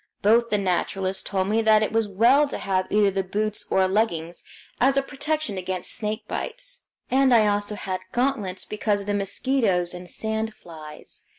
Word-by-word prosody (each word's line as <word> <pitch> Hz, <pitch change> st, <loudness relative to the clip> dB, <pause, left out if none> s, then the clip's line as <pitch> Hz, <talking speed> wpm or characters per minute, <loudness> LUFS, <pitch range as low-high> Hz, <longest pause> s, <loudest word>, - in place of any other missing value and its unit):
Both 230 Hz, +3 st, +4 dB
the 210 Hz, -, +2 dB
naturalists 190 Hz, 0 st, -1 dB
told 190 Hz, -1 st, -1 dB
me 220 Hz, +2 st, +2 dB
that 215 Hz, -1 st, +5 dB
it 215 Hz, -, -1 dB
was 225 Hz, -1 st, +1 dB
well 240 Hz, +9 st, +4 dB
to -, -, -5 dB
have 185 Hz, -1 st, -1 dB
either 205 Hz, -1 st, +4 dB
the 195 Hz, 0 st, -1 dB
boots 210 Hz, +3 st, -2 dB
or 190 Hz, 0 st, +3 dB
leggings 175 Hz, -5 st, -1 dB, 0.4 s
as 270 Hz, +2 st, +3 dB
a 275 Hz, -, +3 dB
protection 290 Hz, -6 st, -2 dB
against 185 Hz, 0 st, -3 dB
snake 215 Hz, 0 st, -3 dB
bites, -, -, -4 dB, 0.3 s
and 265 Hz, 0 st, +4 dB
I 225 Hz, -3 st, +6 dB
also 205 Hz, 0 st, 0 dB
had 185 Hz, -2 st, -4 dB
gauntlets 230 Hz, -8 st, -1 dB
because 210 Hz, -1 st, -1 dB
of -, -, -8 dB
the 205 Hz, -, -1 dB
mosquitoes 200 Hz, -3 st, 0 dB
and 180 Hz, 0 st, -8 dB
sand 220 Hz, +2 st, -3 dB
flies. 155 Hz, -3 st, -9 dB
210 Hz, 180 wpm, -24 LUFS, 190-230 Hz, 0.4 s, I